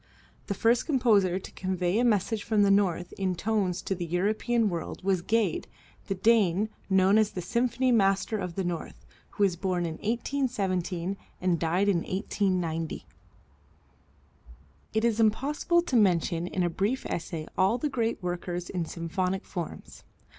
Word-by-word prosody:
The 200 - -2
first 230 +4 +2
composer 215 - +3
to 190 - -8
convey 185 +1 -1
a - - +3
message 220 -1 +1
from 215 -2 +2
the 200 - +4
North 185 -3 +1
in 185 -2 0
tones 195 -2 -1
to - - -1
the 175 -2 -4
European 215 +6 +1
world 175 0 -4
was 190 -2 +1
Gade, 215 -2 0 0.4
the 195 - -1
Dane, 210 -1 +3 0.2
known 190 +2 +5
as 215 -1 +3
the 185 - -6
Symphony 250 +5 +1
Master 200 0 +2
of 180 -3 -4
the 195 - -1
North, 175 -2 -5 0.3
who 205 - 0
was 190 -3 +3
born 180 -1 -1
in 160 -1 -4
1817 200 -7 -1 0.2
and 180 -2 +1
died 175 +5 +1
in 200 -3 +3
1890. 180 -3 -2 1.9
It 220 +1 +1
is 230 -1 +1
impossible 285 +10 +2
to 280 - -2
mention 175 -5 +2
in 185 0 -1
a - - +2
brief 205 +10 -1
essay 160 -2 -4
all 190 +5 +3
the 275 - -1
great 230 -7 -2
workers 175 0 -3
in 175 -3 -2
symphonic 180 +4 -2
forms. 175 -4 -7
195 Hz, 155 wpm, -28 LUFS, 175-220 Hz, 1.9 s, known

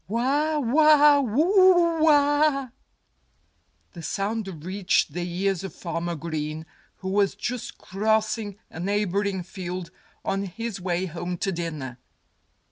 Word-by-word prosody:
"Wha 280 - +1
wha! 295 +2 +5
Whoo 335 - +4
ah!" 290 -2 +3 1.2
The 170 - -9
sound 195 -3 -3
reached 190 0 +1
the 175 - -3
ears 180 +2 -1
of 195 - -7
Farmer 170 0 -3
Green, 155 -1 -4 0.3
who 190 - -6
was 200 0 +2
just 245 -1 -5
crossing 215 0 -1
a - - -9
neighboring 200 0 -1
field, 180 -1 -6 0.3
on 195 +1 -1
his 205 +1 -5
way 180 0 -1
home 175 +1 -5
to 195 - -1
dinner. 155 -8 -5
200 Hz, 120 wpm, -25 LUFS, 175-260 Hz, 1.2 s, wha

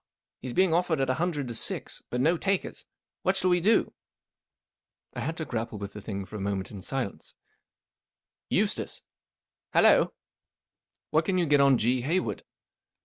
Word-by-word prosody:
He 130 - -7
is 125 - -4
being 185 -3 +4
offered 170 -3 +1
at 135 -1 +1
a 130 - -2
hun¬ 175 +1 +2
dred 145 -4 -3
t 120 - -6
O - - -4
six* 115 - -1
but 125 - -2
no 160 +7 +3
takers. 195 +2 -2 0.3
What 190 +1 +1
shall 185 -1 +2
we 180 - +4
do? 215 +6 +3 1.2
I - - -6
had 160 - -3
to 160 - -3
grapple 115 -4 -4
with 100 0 -7
the 105 - -8
thing 100 -2 -5
for 100 - -11
a - - -6
moment 95 -1 -2
in 100 -3 -8
silence* 130 0 -4 1.1
,r - - 0
Eustace*" - - 0
II - - -64
Hallo? - - +5 0.3
" - - -65
" - - -62
What 155 +1 +3
can 185 +1 +1
you 175 - +2
get 145 -2 +4
on 140 -2 +5
G. 125 +3 +1
Hayward 165 +9 -1
140 Hz, 200 wpm, -28 LUFS, 115-175 Hz, 1.2 s, Hallo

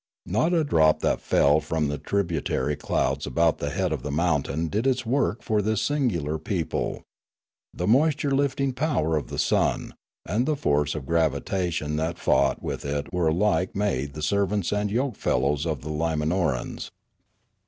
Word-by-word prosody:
Not 110 - +1
a 170 -3 +3
drop 80 - +3
that - - +1
fell 75 +2 +3
from 80 0 -1
the 75 0 -3
tributary 80 -7 -1
clouds - - -1
about 85 -1 +2
the 70 - -2
head - - -1
of - - -3
the 75 - -5
mountain 80 -1 0
but 80 - -3
did 110 +6 0
its 130 -2 +1
work 120 -2 0
for 110 -2 +1
this 110 0 0
singular 110 - 0
people; 80 -2 -2 0.7
the 90 - -4
moisture 140 - +3
lifting 140 -1 +1
power 125 - 0
of 75 - -2
the - - -6
sun, - - +1 0.3
and 120 +5 0
the 155 - +2
force 75 - +1
of 75 -4 -5
gravitation 80 0 0
that 80 +2 -2
fought 70 - +2
with - - -4
it 70 +2 -3
were 90 -2 +1
alike 90 +3 +1
made 70 -9 -1
the 75 - -5
servants 100 +2 0
and 105 0 0
yoke 125 +3 -1
fellows 75 +3 0
of 75 -5 -2
the 75 - -5
Limanorans. 80 -2 -1
85 Hz, 170 wpm, -25 LUFS, 75-110 Hz, 0.7 s, a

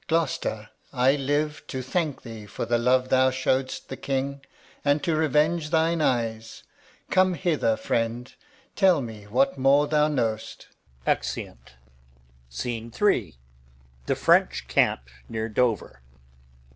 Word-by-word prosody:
Alb. - - -33
Gloucester, 155 -10 -1 0.2
I 130 +1 +3
live 145 +2 -1
To 130 -2 -4
thank 150 +2 -2
thee 110 -3 -9
for 105 - -4
the 120 +1 +1
love 125 +2 +2
thou 130 0 +4
show'dst 130 0 -1
the 135 - -7
King, 140 0 -3 0.4
And 145 0 +2
to 165 - +1
revenge 155 +1 +1
thine 165 0 +2
eyes. 115 -5 -1 0.5
Come 185 -1 +3
hither, 155 - +1
friend. 115 +2 -2 0.4
Tell 190 -5 +4
me 110 -3 -9
what 130 +5 +1
more 140 +2 +4
thou 150 0 +2
know'st. 115 -7 -3 0.4
Exeunt. - - -3 0.8
Scene 115 - -5
III. 115 - +1 0.7
The - - +1
French 60 - +2
camp - - +2 0.3
near 110 0 -3
Dover. 110 - -1
130 Hz, 130 wpm, -25 LUFS, 115-150 Hz, 0.8 s, thou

